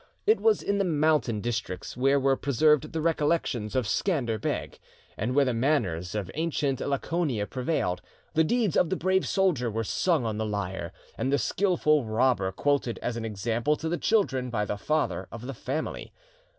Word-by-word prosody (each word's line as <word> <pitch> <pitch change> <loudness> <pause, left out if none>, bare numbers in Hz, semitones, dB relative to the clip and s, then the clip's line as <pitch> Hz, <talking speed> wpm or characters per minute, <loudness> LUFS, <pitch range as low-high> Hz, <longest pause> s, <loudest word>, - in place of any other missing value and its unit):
It 435 +1 +4
was 445 -1 +3
in 200 0 0
the - - +3
mountain 155 - +1
districts 115 -6 -4
where 135 +3 +3
were 135 0 +3
preserved 150 +3 +2
the 160 - -2
recollections 150 -8 0
of 130 -3 +1
Scander 120 - 0
Beg, - - -3 0.4
and 125 +3 -2
where 140 -1 +5
the 125 - 0
manners 110 - 0
of 100 -4 -3
ancient 145 -4 -1
Laconia 140 -5 -1
prevailed; 125 - -1 0.3
the 160 - +4
deeds 220 +1 +1
of 170 - +3
the 190 - 0
brave 190 0 +1
soldier 175 - +1
were 115 +1 -2
sung 160 - +1
on 110 -1 -2
the - - 0
lyre, 100 -3 -3 0.3
and 135 - 0
the 140 - +4
skilful 155 -7 +2
robber 110 -3 +1
quoted 140 +2 0
as 120 - -2
an 115 -1 -4
example 115 +6 0
to 160 - -5
the 170 +1 -1
children 135 - +1
by 105 -3 -1
the 105 - -2
father 155 +9 -1
of 115 +1 -8
the 135 - -4
family. 135 +5 -4
135 Hz, 180 wpm, -27 LUFS, 115-160 Hz, 0.4 s, where